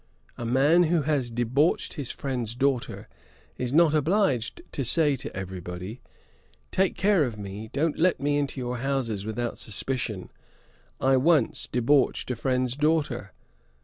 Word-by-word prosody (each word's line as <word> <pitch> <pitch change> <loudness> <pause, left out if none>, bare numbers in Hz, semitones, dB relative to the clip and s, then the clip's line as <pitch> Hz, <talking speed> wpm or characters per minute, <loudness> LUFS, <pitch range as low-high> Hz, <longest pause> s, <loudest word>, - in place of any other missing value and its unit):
A 120 - -5
man 145 +8 +4
who 165 -1 +1
has 140 -5 0
debauched 120 +7 +1
his 145 -6 -4
friend's 125 -5 -3
daughter 135 -1 -1 0.5
is 125 -1 -1
not 160 +1 +5
obliged 155 - +1
to 140 - -2
say 145 +3 +3
to - - -8
every 95 0 -5
body 90 +7 -7 0.7
"Take 190 0 +1
care 195 -5 +3
of 120 -5 -3
me; 100 +2 -7
don't 150 +3 0
let 180 -2 +3
me 145 +1 +1
into 140 -1 -3
your 125 0 -3
houses 120 -6 -2
without 120 +2 -3
suspicion. 110 -3 -2 0.7
I 135 0 +3
once 150 -1 +2
debauched 130 +1 +2
a - - -1
friend's 125 +1 0
daughter. 145 - 0
130 Hz, 145 wpm, -26 LUFS, 115-150 Hz, 0.7 s, not